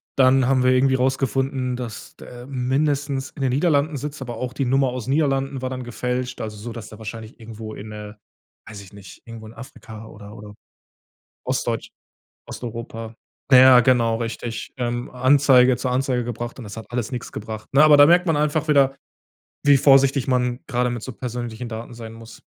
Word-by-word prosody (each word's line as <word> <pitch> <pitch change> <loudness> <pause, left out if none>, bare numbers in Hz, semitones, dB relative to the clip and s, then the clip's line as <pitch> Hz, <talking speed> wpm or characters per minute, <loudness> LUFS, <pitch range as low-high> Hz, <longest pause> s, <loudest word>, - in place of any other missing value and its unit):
dann 130 -1 +4
haben 130 -1 +2
wir 130 - +4
irgendwie 130 +1 +3
rausgefunden, 130 0 -1
dass 120 -3 -8
der 120 0 -12
mindestens 140 +1 -1
in 145 - -10
den 130 - +1
Niederlanden 145 +1 +1
sitzt, 145 +1 -6
aber 120 -3 -6
auch 125 +1 -4
die 135 0 -2
Nummer 135 +1 +2
aus 125 -2 -5
Niederlanden 135 -2 0
war 130 - -3
dann 130 -1 -5
gefälscht, 125 +1 -4
also 105 -1 -6
so, 115 +3 -7
dass 110 -2 -9
der 110 - -12
wahrscheinlich 110 +1 -9
irgendwo 110 -1 -9
in 105 +1 -9
äh, 105 -1 -8 0.5
weiß 105 -2 -9
ich 95 - -15
nicht, 100 -2 -13
irgendwo 115 -1 -10
in 110 - -12
Afrika 115 -3 -11
oder 105 -1 -12
oder 105 0 -11 0.9
Ostdeutsch - - -2 0.6
Osteuropa 115 -1 -7 0.4
na 130 - +8
ja, 130 -1 +8
genau, 115 -2 +2
richtig, 115 0 -5
ähm, 120 -1 -3
Anzeige 130 -1 +4
zur 125 0 -2
Anzeige 125 -1 0
gebracht 120 +1 -6
und 125 - -8
das 100 0 -9
hat 110 - -7
alles 120 -1 -3
nix 125 - -6
gebracht, 110 0 -7
ne? 140 +2 +6
Aber 155 -1 +7
da 145 - +8
merkt 175 +4 +4
man 165 -3 +2
einfach 150 +1 0
wieder, 140 -2 +4 0.7
wie 145 -1 +6
vorsichtig 135 -1 +4
man 125 -1 0
grade 125 -1 0
mit 120 -2 -5
so 130 - -6
persönlichen 120 -1 -6
Daten 115 +1 -7
sein 115 -1 -9
muss. 115 0 -13
125 Hz, 190 wpm, -22 LUFS, 115-135 Hz, 0.9 s, na